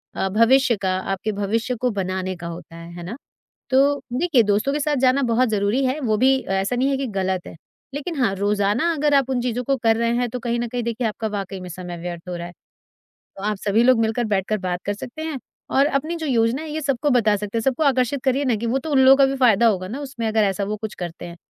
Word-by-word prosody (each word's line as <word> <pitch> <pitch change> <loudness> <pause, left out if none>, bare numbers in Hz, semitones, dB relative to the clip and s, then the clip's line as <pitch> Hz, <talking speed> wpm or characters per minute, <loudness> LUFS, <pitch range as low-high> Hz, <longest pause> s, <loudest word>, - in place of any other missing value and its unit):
अ, 190 - 0
भविष्य 235 +5 +4
का, 185 -1 0
आपके 195 +3 -3
भविष्य 220 +5 -1
को 250 - +2
बनाने 185 0 -3
का 170 -1 -8
होता 165 0 -9
है। 170 0 -10
है 175 - -7
ना? 185 +7 -6 0.6
तो 280 +2 +3
देखिए, 280 -2 +3
दोस्तों 210 +6 +1
के 295 - -1
साथ 295 0 0
जाना 265 +2 +3
बहुत 250 +1 +3
ज़रूरी 215 +5 +1
है, 260 +4 0
वो 220 -6 +1
भी 265 +4 +4 0.2
ऐसा 205 +6 -1
नहीं 260 +3 +2
है 275 - +1
कि 270 - -2
गलत 190 -1 -1
है। - - -9 0.4
लेकिन 295 +4 -4
हाँ, 195 -4 +2
रोज़ाना 205 - +1
अगर 295 -1 +1
आप 270 -2 +3
उन 255 -2 0
चीज़ों 245 0 -1
को 275 +3 +1
कर 225 -2 +2
रहे 230 0 +1
हैं, 245 0 0
तो 250 - -4
कहीं 235 0 -1
न 240 - -1
कहीं 245 +1 -3
देखिए, 235 +1 -2
आपका 220 +1 -3
वाक़ई 195 -2 -5
में 180 - -8
समय 175 0 -7
व्यर्थ 175 0 -7
हो 180 - -3
रहा 170 0 -6
है। 175 - -10 0.9
तो 195 - -8
आप 210 -1 -1
सभी 210 +4 +2
लोग 255 -2 +5
मिलकर, 225 +2 0
बैठकर 210 0 0
बात 180 -2 -3
कर 205 - 0
सकते 245 +8 -8
हैं 315 -3 -3 0.3
और 275 +1 +3
अपनी 305 +3 -1
जो 325 -1 -4
योजना 240 0 +1
है, 320 - -7
ये 315 - -3
सबको 280 0 0
बता 220 -5 +3
सकते 210 +2 -4
हैं। - - +1
सबको 270 +5 0
आकर्षित 260 -1 +1
करिए 265 +1 +1
ना, 245 - +2
कि 220 +2 -4
वो 235 +3 +1
तो 315 - -7
उन 275 - +4
लोगों 265 +1 +9
का 275 - +6
भी 270 0 -1
फ़ायदा 235 -3 +4
होगा 185 -4 0
ना 250 +8 -6
उसमें, 260 -5 -4
अगर 220 0 +2
ऐसा 195 0 0
वो 210 +2 -2
कुछ 220 -1 -4
करते 175 -1 -7
हैं। 170 0 -9
230 Hz, 260 wpm, -22 LUFS, 200-265 Hz, 0.9 s, लोगों